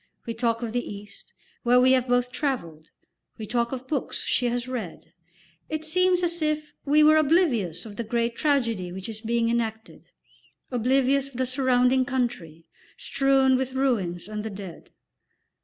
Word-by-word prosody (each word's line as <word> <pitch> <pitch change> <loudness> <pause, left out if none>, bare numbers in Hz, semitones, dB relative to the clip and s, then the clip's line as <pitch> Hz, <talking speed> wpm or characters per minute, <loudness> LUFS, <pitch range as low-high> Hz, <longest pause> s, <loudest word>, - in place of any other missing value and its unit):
We 230 - -3
talk 230 0 -1
of 225 -2 -4
the 245 0 0
East, 200 0 -11 0.3
where 245 0 +4
we 255 +1 +5
have 260 -1 +3
both 245 0 +1
travelled; 170 - -3 0.5
we 220 - -6
talk 235 +2 -1
of 260 -1 -6
books 280 -2 -2
she 245 - +1
has 240 +1 -2
read; 230 -10 -6 0.6
it 310 0 -3
seems 365 +2 +2
as 340 -1 -1
if 305 -1 -1
we 300 +2 +4
were 310 +1 +6
oblivious 275 - +2
of 205 -2 -10
the 235 - -2
great 235 +1 -1
tragedy 230 - 0
which 190 +1 -7
is 220 -1 -6
being 230 0 0
enacted, 225 -1 -3 0.6
oblivious 265 +3 +2
of 275 - -17
the 260 - +1
surrounding 255 0 +2
country, 210 -11 -3 0.3
strewn 270 -1 +2
with 260 0 -2
ruins 200 -10 -1
and 210 0 -5
the 220 - -4
dead. 195 -5 -9
245 Hz, 165 wpm, -25 LUFS, 220-270 Hz, 0.6 s, were